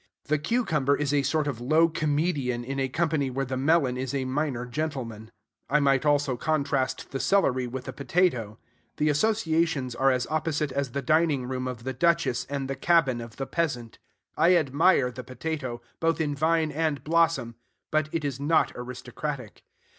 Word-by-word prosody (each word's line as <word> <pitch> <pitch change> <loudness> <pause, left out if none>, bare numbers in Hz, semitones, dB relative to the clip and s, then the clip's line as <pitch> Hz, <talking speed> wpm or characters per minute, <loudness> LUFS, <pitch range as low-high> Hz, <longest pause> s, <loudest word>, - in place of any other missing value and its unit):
The 150 +1 +1
cucumber 150 - +1
is 145 -1 -1
a 145 - +3
sort 150 +2 0
of 135 -5 -3
low 155 +6 +4
comedian 150 -5 -1
in 135 +3 -4
a 135 -1 0
company 155 -2 0
where 135 +2 -2
the 130 0 -3
melon 135 -1 +2
is 130 +1 -3
a 135 -1 -1
minor 130 -2 -1
gentleman. 125 -5 -4 0.4
I 150 - +4
might 140 +1 +2
also 145 -3 +2
contrast 140 -3 -1
the 135 - -3
celery 130 -11 +2
with 130 +1 -6
the 130 - -6
potato. 135 - 0 0.4
The 150 0 +2
associations 160 - +1
are 135 +3 +3
as 125 -1 +1
opposite 155 -2 -1
as 135 -2 -2
the 140 - -2
dining 155 -5 +2
room 130 0 -3
of 125 -2 -6
the 130 +1 -3
duchess 165 -3 +1
and 140 -1 -3
the 135 - -3
cabin 135 -5 +2
of 115 -2 -9
the 135 - -4
peasant. 135 -8 -3 0.4
I 180 +2 +5
admire 150 -2 +3
the 125 +1 -8
potato, 130 -1 -4 0.2
both 165 0 +1
in 150 -2 0
vine 160 +1 +1
and 155 -1 -1
blossom; 165 -7 +2 0.4
but 155 0 +1
it 160 -3 -2
is 135 -2 -3
not 150 +3 +2
aristocratic. 125 0 -6
140 Hz, 175 wpm, -27 LUFS, 130-155 Hz, 0.4 s, I